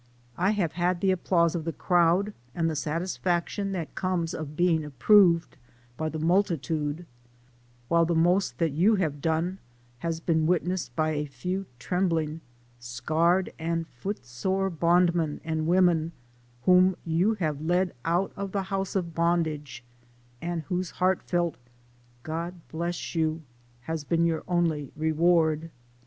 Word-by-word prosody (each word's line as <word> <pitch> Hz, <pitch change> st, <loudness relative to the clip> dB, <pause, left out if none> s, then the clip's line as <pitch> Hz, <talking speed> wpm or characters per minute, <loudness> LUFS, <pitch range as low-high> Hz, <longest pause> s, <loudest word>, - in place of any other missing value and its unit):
I 185 Hz, +3 st, +1 dB
have 170 Hz, -6 st, +1 dB
had 175 Hz, +1 st, 0 dB
the 190 Hz, +1 st, +2 dB
applause 170 Hz, -2 st, +2 dB
of 170 Hz, -3 st, -2 dB
the 165 Hz, -, -2 dB
crowd 180 Hz, +4 st, +2 dB, 0.2 s
and 165 Hz, -1 st, +1 dB
the 160 Hz, -, -1 dB
satisfaction 175 Hz, +4 st, -1 dB
that 170 Hz, -4 st, -4 dB
comes 180 Hz, -3 st, -1 dB
of 150 Hz, -1 st, -6 dB
being 170 Hz, -2 st, +2 dB
approved 170 Hz, -, +4 dB, 0.4 s
by 155 Hz, +4 st, -2 dB
the 155 Hz, -, -5 dB
multitude, 165 Hz, -2 st, 0 dB, 0.8 s
while 170 Hz, +3 st, +3 dB
the 170 Hz, -, +1 dB
most 175 Hz, +4 st, +2 dB
that 165 Hz, -3 st, +1 dB
you 185 Hz, +10 st, +3 dB
have 155 Hz, -7 st, -1 dB
done 165 Hz, +4 st, 0 dB, 0.4 s
has 165 Hz, -1 st, -2 dB
been 160 Hz, -1 st, +1 dB
witnessed 180 Hz, +1 st, -1 dB
by 155 Hz, -1 st, +1 dB
a 150 Hz, -1 st, -2 dB
few 180 Hz, +8 st, -4 dB
trembling, 165 Hz, 0 st, -1 dB, 0.4 s
scarred, 155 Hz, +10 st, +1 dB
and 165 Hz, 0 st, -1 dB
foot 165 Hz, -, -6 dB
sore 190 Hz, +10 st, -1 dB
bondmen 170 Hz, -1 st, +2 dB
and 160 Hz, -1 st, -2 dB
women, 170 Hz, -2 st, +3 dB, 0.5 s
whom 185 Hz, 0 st, +5 dB
you 175 Hz, +7 st, +2 dB
have 155 Hz, -7 st, -2 dB
led 175 Hz, +3 st, +1 dB
out 175 Hz, +4 st, +1 dB
of 200 Hz, -1 st, -5 dB
the 200 Hz, -1 st, 0 dB
house 195 Hz, 0 st, -3 dB
of 170 Hz, -4 st, -1 dB
bondage, 160 Hz, -6 st, -1 dB, 0.6 s
and 170 Hz, -1 st, -3 dB
whose 180 Hz, +4 st, -2 dB
heartfelt 175 Hz, -2 st, +1 dB, 0.4 s
" 120 Hz, 0 st, -32 dB
God 165 Hz, +3 st, -4 dB, 0.2 s
bless 170 Hz, +2 st, -3 dB
you" 160 Hz, -1 st, 0 dB, 0.4 s
has 160 Hz, +4 st, -4 dB
been 170 Hz, +3 st, +1 dB
your 165 Hz, -1 st, 0 dB
only 165 Hz, -6 st, 0 dB
reward. 160 Hz, 0 st, +2 dB
170 Hz, 145 wpm, -27 LUFS, 155-180 Hz, 0.8 s, whom